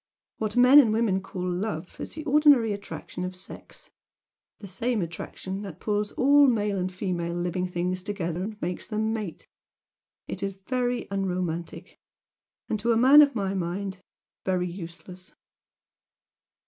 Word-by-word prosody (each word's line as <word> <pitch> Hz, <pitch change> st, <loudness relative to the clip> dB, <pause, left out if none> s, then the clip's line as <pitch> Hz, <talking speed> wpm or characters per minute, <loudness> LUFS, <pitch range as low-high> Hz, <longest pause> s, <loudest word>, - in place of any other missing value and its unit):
What 215 Hz, +1 st, -3 dB
men 250 Hz, +4 st, +9 dB
and 235 Hz, -7 st, +5 dB
women 215 Hz, -4 st, +1 dB
call 185 Hz, -1 st, -5 dB
'love' 180 Hz, -1 st, -4 dB
is -, -, -6 dB
the 310 Hz, -, -6 dB
ordinary 285 Hz, -7 st, +5 dB
attraction 200 Hz, -2 st, -7 dB
of 180 Hz, 0 st, -4 dB
sex, 185 Hz, -, -11 dB, 0.7 s
the 200 Hz, -, -10 dB
same 230 Hz, +5 st, -1 dB
attraction 190 Hz, +3 st, -6 dB
that 190 Hz, -5 st, -8 dB
pulls 210 Hz, -1 st, -1 dB
all 285 Hz, +2 st, +5 dB
male 210 Hz, -5 st, +1 dB
and 185 Hz, +1 st, -2 dB
female 175 Hz, -3 st, -3 dB
living 180 Hz, +1 st, -1 dB
things 180 Hz, +1 st, -2 dB
together 180 Hz, -4 st, -3 dB
and 210 Hz, 0 st, -7 dB
makes 180 Hz, +1 st, -3 dB
them 220 Hz, 0 st, -1 dB
mate. 210 Hz, -7 st, -5 dB, 0.8 s
It -, -, -5 dB
is 195 Hz, -1 st, -3 dB
very 245 Hz, -1 st, -1 dB
unromantic! 180 Hz, -4 st, -3 dB, 0.7 s
And 215 Hz, -, -1 dB
to 230 Hz, +3 st, +2 dB
a -, -, +2 dB
man 270 Hz, +5 st, +8 dB
of 285 Hz, -3 st, +4 dB
my 195 Hz, -3 st, -1 dB
mind, 190 Hz, +1 st, -3 dB, 0.4 s
very 180 Hz, -1 st, 0 dB
useless." 180 Hz, +1 st, -9 dB
195 Hz, 150 wpm, -26 LUFS, 180-225 Hz, 0.8 s, men